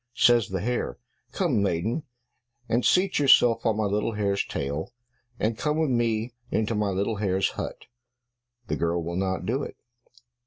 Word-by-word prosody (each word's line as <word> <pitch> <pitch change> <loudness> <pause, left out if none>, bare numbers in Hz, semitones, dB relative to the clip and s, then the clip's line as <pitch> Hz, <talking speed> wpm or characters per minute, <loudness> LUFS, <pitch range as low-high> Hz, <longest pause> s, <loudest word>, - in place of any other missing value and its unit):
Says 120 -2 +4
the 95 -1 -2
hare, 120 +3 -2 0.3
"Come, 150 - +1
maiden, 100 - 0 0.7
and 120 +2 +1
seat 185 -1 +3
yourself 125 -4 +5
on 110 -2 +1
my 110 - +1
little 105 +2 0
hare's 100 -2 0
tail, 70 +3 -4 0.5
and 110 +1 0
come 150 0 0
with 160 -4 +1
me 115 -1 0 0.2
into 110 +1 0
my 105 -1 0
little 100 +3 -1
hare's 95 -2 +1
hut." - - -6 0.8
The - - -2
girl 85 0 0
will 85 +1 -4
not 95 0 -1
do 125 +7 0
it. - - -7
110 Hz, 160 wpm, -26 LUFS, 95-120 Hz, 0.8 s, yourself